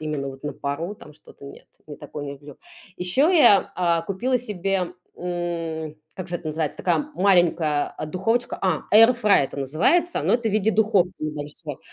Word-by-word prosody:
именно 150 -3 -3
вот 135 0 -10
на 150 - -4
пару 160 +8 -4
там 150 -7 -14
что-то 145 -1 -17
нет, 140 - -12 0.2
не 150 -1 -9
такое 145 -1 -8
люблю. 140 0 -13 0.4
Еще 180 +9 0
я, 235 -10 +5
а, 170 -2 +1
купила 235 +9 -1
себе, 195 -5 -2 0.2
м, 165 -3 -4 0.2
как 185 -1 -7
же 175 - -2
это 170 - -11
называется, 155 -1 -3
такая 190 - 0
маленькая, 175 -6 +2
а, 155 - -5
духовочка. 210 +9 -1
А, 185 -5 0
air 225 +3 +8
fryer 205 -9 +4
это 135 - -8
называется, 170 - +1
но - - +2
это 235 -2 0
в - - -3
виде 215 +1 +2
духовки 200 -5 +1
небольшой. 150 -1 -5
175 Hz, 175 wpm, -23 LUFS, 150-200 Hz, 0.4 s, air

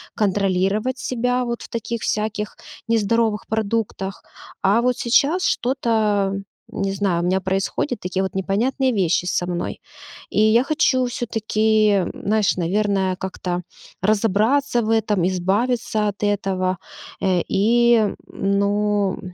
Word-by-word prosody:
контролировать 200 +3 0
себя 250 +1 0
вот 235 -1 -3
в - - -9
таких 230 0 -4
всяких 210 0 -2 0.3
нездоровых 225 -1 +1
продуктах, 215 -3 -2 0.4
а 200 +4 +4
вот 250 0 +1
сейчас 285 +9 +2
что-то, 220 -6 +1 0.4
не 195 -1 -2
знаю, 190 -4 0
у - - 0
меня 190 +2 +1
происходят 195 +7 -1
такие 185 +1 -2
вот 190 - -4
непонятные 235 +8 0
вещи 180 -4 +1
со 180 0 -1
мной, 175 -1 -4 0.5
и 200 - -1
я 220 +3 +5
хочу 270 -3 +2
всё-таки, 220 -4 +1
знаешь, 210 -2 0
наверное, 190 +1 0
как-то, 180 -1 -4 0.4
разобраться 220 +6 +2
в 215 - -2
этом, 210 -5 +2
избавиться 210 +4 0
от 200 +1 -7
этого, 190 -2 0 0.4
э, 185 -2 +2
и, 230 +1 +3
ну, 200 0 0
210 Hz, 120 wpm, -21 LUFS, 195-230 Hz, 0.5 s, я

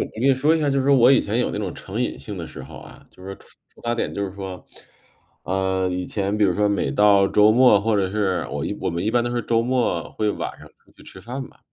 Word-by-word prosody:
跟 110 - -5
你 135 - +5
说 145 +5 +2
一 - - -2
下， 150 - +1
就 135 - +1
是 130 - -2
说 140 -1 +5
我 125 +2 +6
以 - - +5
前 105 +3 -2
有 125 - 0
那 - - -4
种 100 -4 -3
成 100 +5 -6
瘾 125 - -2
性 105 -3 -8
的 85 - -6
时 80 - -10
候 - - -11
啊， - - -15
就 - - -18
是 95 - -9
说 95 - -6
触 - - -21 0.3
触 - - -19
发 120 0 -1
点 120 - -3
就 100 - -2
是 95 - -6
说， 95 -2 -8 0.8
呃， 95 0 0
以 90 0 -3
前 100 0 -2
比 105 - +3
如 90 -3 +2
说 105 +2 +1
每 100 - 0
到 100 -2 +4
周 105 +1 +5
末 120 -3 +5
或 110 +1 +1
者 95 -2 0
是 95 -4 -1
我 75 +1 -3
一 100 - -3
我 - - -1
们 85 +1 -3
一 110 - +1
般 120 +1 +2
都 120 - -2
是 120 - 0
周 115 +1 +1
末 120 -9 -1
会 105 -1 -1
晚 - - -5
上 - - -14
出 - - -29
去 - - -19
吃 95 - -12
饭 130 +5 -6
吧。 - - -23
105 Hz, 315 characters per minute, -22 LUFS, 95-120 Hz, 0.8 s, 我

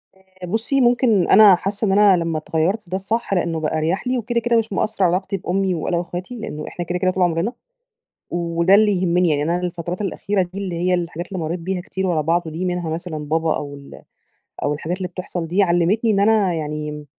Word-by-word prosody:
آآ، 190 -1 -13
بُصّي 225 +8 0
ممكن 240 -6 +3
أنا 205 -2 +8
حاسة 200 +4 -3
إن - - +2
أنا 200 -1 +5
لما 165 -2 -1
اتغيَّرت 170 +6 -1
ده 185 - -2
الصح؛ 220 +3 -2
لأنه 170 -3 0
بقى 155 0 -1
أريح 165 +9 -1
لي، 255 0 +1
وكده 235 0 -1
كده 235 0 +1
مش 225 -2 -1
مأثر 215 0 0
علي 175 0 +3
علاقتي 190 +1 -2
بأمي 190 0 -1
وأنا 170 +2 -1
وإخواتي؛ 175 +4 -7
لأنه 155 -10 -6
إحنا 175 - -5
كده 175 +1 -2
كده 185 0 +2
طول 185 0 0
عمرنا، 175 +6 0 0.8
وده 170 +2 +2
اللي 210 0 +5
يهمني 180 0 +2
يعني، 145 -2 +1
أنا 170 +4 0
الفترات 175 0 -4
الأخيرة 200 0 -1
دي 180 +2 -7
اللي 190 -3 -4
هي 180 +2 +1
الحاجات 175 -1 -3
اللي 190 - -5
مريت 170 +2 -3
بيها 185 +2 -3
كتير 190 +1 -4
ورا 170 -4 +1
بعض 170 +2 0
دي، 160 +4 -4
منها 180 -2 -2
مثلًا 165 0 -4
بابا 160 +2 0
أو 145 -1 -5
ال 140 0 -12 0.6
أو - - +1
الحاجات 160 +4 -3
اللي 185 -1 -4
بتحصل 180 -1 -5
دي 185 +5 +2
علمتني 185 +5 +2
إن 200 -2 +2
أنا 205 -3 +3
يعني، 150 -1 -5
180 Hz, 215 wpm, -21 LUFS, 165-200 Hz, 0.8 s, أنا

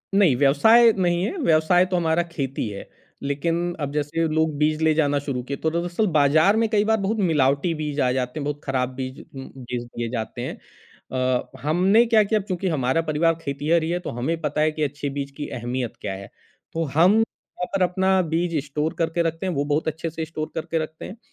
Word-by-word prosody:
नहीं, 185 -10 +5
व्यवसाय 220 - +6
नहीं 175 -1 +1
है, 350 - -2
व्यवसाय 175 - +3
तो 185 0 -2
हमारा 170 0 +2
खेती 135 -7 -3
है। 100 -1 -8 0.4
लेकिन 170 +5 -1
अब 145 -2 -3
जैसे 150 +3 0
लोग 160 -1 +1
बीज 155 +1 +1
ले 160 -1 +4
जाना 145 -2 +2
शुरू 140 -3 -3
किए 140 +2 -5
तो 160 - 0
दरअसल 175 +5 0
बाज़ार 155 +8 +4
में 225 0 +2
कई 210 -2 +2
बार 220 0 +3
बहुत 205 +3 -1
मिलावटी 150 -2 +2
बीज 150 -1 -4
आ 125 - +2
जाते 125 +3 -2
हैं, 145 - -3
बहुत 145 0 -4
खराब 130 -2 -1
बीज 130 0 -5
उम, 135 -1 -10
बेच 125 -1 -5
दिए 120 -1 -5
जाते 120 0 -4
हैं। 125 - -4 0.6
अ, 130 -1 0
हमने 185 +10 +4
क्या 225 -2 +4
किया 215 +1 +1
अब 195 - -8
चूँकि 185 0 -2
हमारा 135 0 +1
परिवार 165 +1 +1
खेतीहर 150 +3 0
ही 160 - -2
है 175 +1 0
तो - - -6
हमें 160 +6 -1
पता 150 0 -1
है 155 0 +3
कि 155 0 -3
अच्छे 145 0 -3
बीज 140 0 -4
की 145 - -4
अहमियत 120 0 -3
क्या 100 - -3
है। 100 +1 -9 0.4
तो 165 0 -1
हम 180 +6 +6
वहाँ 225 -4 -4
पर 195 - 0
अपना 190 +1 +2
बीज 165 0 -1
स्टोर 150 +2 -2
करके 165 +1 0
रखते 165 +3 -2
हैं, 185 - -1
वो 140 -2 0
बहुत 150 +2 0
अच्छे 160 +1 -2
से 160 0 -4
स्टोर 155 -1 -5
करके 165 +1 -2
रखते 155 0 -8
हैं। 205 - -9
155 Hz, 220 wpm, -23 LUFS, 140-175 Hz, 0.6 s, व्यवसाय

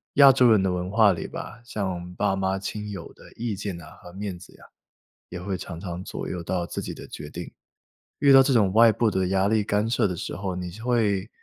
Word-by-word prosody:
亚 140 -1 +9
洲 125 -2 +5
人 105 -3 +4
的 95 - +1
文 90 0 -3
化 105 -1 +5
里 85 - -5
吧， 115 - -8
像 95 -6 -4
爸 100 0 +1
妈 95 0 0
亲 105 +2 -5
友 95 -5 -8
的 - - -17
意 115 -3 -3
见 95 -2 -5
啊 - - -13
和 90 - -12
面 95 -2 -5
子 90 - -14
呀， - - -17 0.7
也 90 - -6
会 95 +1 -3
常 85 -2 -8
常 90 -1 -6
左 - - -6
右 90 -2 -4
到 85 +1 -2
自 - - -5
己 - - -5
的 - - -10
决 - - -8
定。 - - -7 0.7
遇 140 - +5
到 135 0 +9
这 135 +1 +2
种 105 -6 +3
外 115 +1 +7
部 110 0 +1
的 95 -1 0
压 95 +2 +2
力 110 -1 +2
干 105 +2 0
涉 115 -2 +2
的 90 - -3
时 - - -5
候， 95 -1 -3
你 90 -1 -5
是 105 +5 -11
会 110 -5 +1
100 Hz, 265 characters per minute, -25 LUFS, 90-110 Hz, 0.7 s, 亚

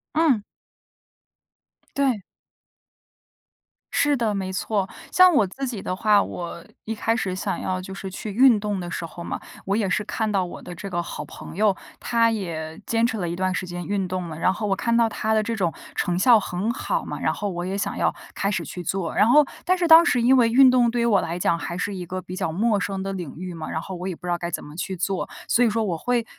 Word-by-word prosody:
嗯。 295 -10 +3 1.5
对。 265 -7 +1 1.7
是 290 -1 +3
的， 225 -3 0
没 190 -2 -3
错。 195 0 -1 0.2
像 370 0 +7
我 220 - +5
自 265 +9 -5
己 235 -5 -4
的 185 - -3
话， 210 +1 +4
我 170 -1 -6 0.2
一 225 - -3
开 225 +1 0
始 190 -5 -2
想 195 +1 -3
要 185 -1 -1
就 190 +1 -7
是 195 0 -6
去 205 +3 -6
运 240 +1 +6
动 205 -1 -2
的 175 -1 -5
时 170 - -4
候 170 +1 -9
嘛， - - -4 0.3
我 195 +2 +1
也 210 -4 +1
是 200 +3 0
看 215 +1 -2
到 195 -2 +2
我 175 - -7
的 180 - -8
这 195 +3 -7
个 175 -2 -1
好 - - -6
朋 - - -10
友， 205 0 +3 0.2
她 230 -1 +2
也 165 -6 -4
坚 230 0 +2
持 225 -2 -1
了 175 -3 -2
一 170 - -3
段 185 +1 0
时 185 - -3
间 175 0 -5
运 195 +1 -1
动 180 -1 -3
了， 155 - -7
然 185 - +3
后 210 +3 -3
我 195 - +2
看 235 +3 +1
到 230 -1 +4
她 220 0 -1
的 215 - +3
这 230 +1 -2
种 180 -6 0 0.2
成 175 -1 0
效 230 +4 +6
很 200 +2 -2
好 - - -2
嘛， - - -5
然 - - +1
后 205 -1 -3
我 175 -1 -4
也 190 +2 -2
想 200 - -2
要 - - +1 0.2
开 200 - -1
始 205 - -2
去 180 - -7
做， 175 -1 -2
然 210 - +4
后 295 +4 +7 0.2
但 370 +1 +2
是 350 -2 +1
当 325 +1 +10
时 250 -8 +2
因 255 +3 +6
为 230 -2 +5
运 260 +2 +7
动 245 -2 +4
对 240 +1 -1
于 235 - +2
我 205 -5 +4
来 170 +2 -3
讲 170 -1 +1
还 170 +1 -4
是 200 +3 -2
一 180 - -5
个 185 +2 -4
比 180 - -8
较 185 -4 -2
陌 210 +4 +1
生 195 0 -3
的 195 0 -3
领 175 -7 -6
域 180 0 -6
嘛， 165 -2 -6
然 - - -2
后 190 +3 -6
我 180 +1 -5
也 185 - -3
不 180 - -13
知 175 - -1
道 175 - +1
该 170 - -3
怎 - - -4
么 150 - -11
去 185 +2 -4
做， 190 +2 -2 0.2
所 245 - +3
以 235 - +4
说 225 +1 0
我 185 -5 -1
会 240 +5 0
195 Hz, 270 characters per minute, -24 LUFS, 180-230 Hz, 1.7 s, 当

